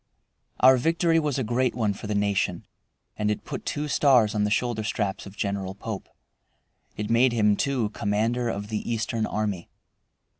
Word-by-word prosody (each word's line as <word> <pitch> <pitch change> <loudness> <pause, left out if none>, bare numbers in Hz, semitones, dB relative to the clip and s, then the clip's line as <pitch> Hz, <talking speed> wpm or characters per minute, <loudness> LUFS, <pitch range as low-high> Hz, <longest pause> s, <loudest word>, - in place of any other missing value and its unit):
Our 130 +1 +7
victory 165 +4 +2
was 150 -4 -1
a 130 - 0
great 120 +2 0
one 110 -4 0
for 100 - -8
the 105 - -1
nation, 100 -4 0 0.5
and 105 0 0
it 105 - -2
put - - -6
two 150 +1 -2
stars 130 -7 +4
on 105 -1 +1
the - - 0
shoulder 110 +1 0
straps 100 -2 -2
of 100 +1 -13
General 100 -2 -2
Pope. 105 0 -6 0.9
It 105 +1 -3
made 120 +1 +4
him, 105 -3 +3
too, 130 -4 0
commander 110 +4 0
of 105 -1 -4
the 110 +1 -3
Eastern 115 -1 -1
army. 105 -5 -3
110 Hz, 175 wpm, -26 LUFS, 105-125 Hz, 0.9 s, Our